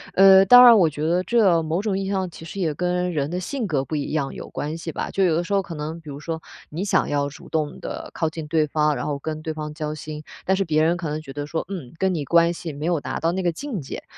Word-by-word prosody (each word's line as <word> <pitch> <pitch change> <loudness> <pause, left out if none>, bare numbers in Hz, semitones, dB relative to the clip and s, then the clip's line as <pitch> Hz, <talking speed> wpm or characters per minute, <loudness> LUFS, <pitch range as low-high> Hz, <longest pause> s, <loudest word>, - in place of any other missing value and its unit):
呃， 195 0 +8
当 245 +5 +9
然 235 -2 +9
我 175 -5 +4
觉 150 0 -7
得 175 +2 +2
这 195 -7 +3
某 160 +4 -1
种 205 -2 -1
意 195 - -2
义 - - -3
上， 190 -2 -1
其 165 - -12
实 185 +4 -7
也 165 -5 0
跟 180 +2 -1
人 145 -1 -1
的 180 - -2
性 245 +6 -3
格 145 -8 -1
不 155 - -4
一 145 - -3
样 145 -3 -1
有 - - -8
关 155 +2 -4
系 165 0 -5
吧。 - - -4
就 195 - +1
有 175 -3 +3
的 170 - 0
时 200 - -3
候 200 - +3
可 185 -3 -8
能 155 +2 -5
比 155 - -11
如 140 0 -7
说 160 +1 -5 0.3
你 165 +5 -4
想 200 - +1
要 145 -1 0
主 145 - -13
动 155 -2 -2
地 - - -7
靠 160 - -1
近 160 0 -7
对 155 -1 +1
方， 150 0 +1
然 - - -4
后 145 -1 -2
跟 155 +2 -5
对 160 0 -4
方 150 -1 -6
交 150 0 -4
心， 150 +1 -7 0.2
但 190 - +3
是 195 - 0
别 155 -2 +2
人 170 +2 +2
可 170 -2 -4
能 155 +1 -3
觉 140 -3 -10
得 145 +1 -5
说， 160 +1 -3
“嗯， 165 -11 -6
跟 190 +1 +1
你 155 -4 -2
关 170 +2 +4
系 165 -2 -6
没 145 +2 -5
有 170 -2 +1
达 - - -4
到 165 - +2
那 190 +2 -2
个 175 - +1
境 265 - -5
界”。 135 - -7
165 Hz, 320 characters per minute, -23 LUFS, 150-185 Hz, 0.3 s, 当